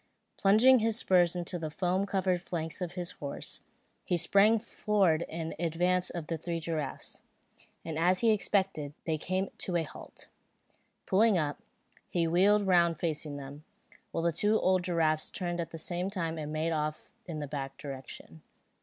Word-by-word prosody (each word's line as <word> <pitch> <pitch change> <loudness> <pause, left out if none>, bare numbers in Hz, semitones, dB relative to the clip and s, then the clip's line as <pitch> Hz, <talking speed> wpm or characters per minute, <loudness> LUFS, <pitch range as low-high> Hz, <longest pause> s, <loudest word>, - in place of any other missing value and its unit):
Plunging 230 +6 +6
his 225 0 +1
spurs 180 -5 +3
into 175 0 -3
the 160 -1 -3
foam 185 +4 0
covered 185 -2 0
flanks 165 -2 -4
of 175 -1 -3
his 180 -1 -4
horse, 140 -1 -5 0.4
he 175 - 0
sprang 200 +6 +5
forward 205 -7 +1
in 165 0 -4
advance 175 +2 +2
of 170 -3 -5
the 165 0 -3
three 170 +1 -3
giraffes; 155 -4 -4 0.7
and 160 -1 -3
as 180 +2 +3
he 230 -1 +5
expected, 190 -8 0
they 160 -2 -1
came 185 +4 -1
to 180 - -2
a 170 - +2
halt. 155 - -12 0.8
Pulling 210 +1 +4
up, 150 -3 -2 0.5
he 170 -2 +1
wheeled 200 +5 +4
round 170 -3 +3
facing 155 -3 -2
them, 140 +2 -9 0.5
while 165 - -2
the 170 - +3
two 210 +6 +2
old 185 -1 +2
giraffes 160 -3 +1
turned 175 -2 -3
at 165 - -5
the 165 - -8
same 175 +3 -2
time 165 -5 -3
and 150 -1 -5
made 155 +2 -1
off 155 -1 -3 0.2
in 165 -3 -5
the 150 - -3
back 135 -1 -5
direction. 130 - -9
170 Hz, 170 wpm, -30 LUFS, 155-190 Hz, 0.8 s, Plunging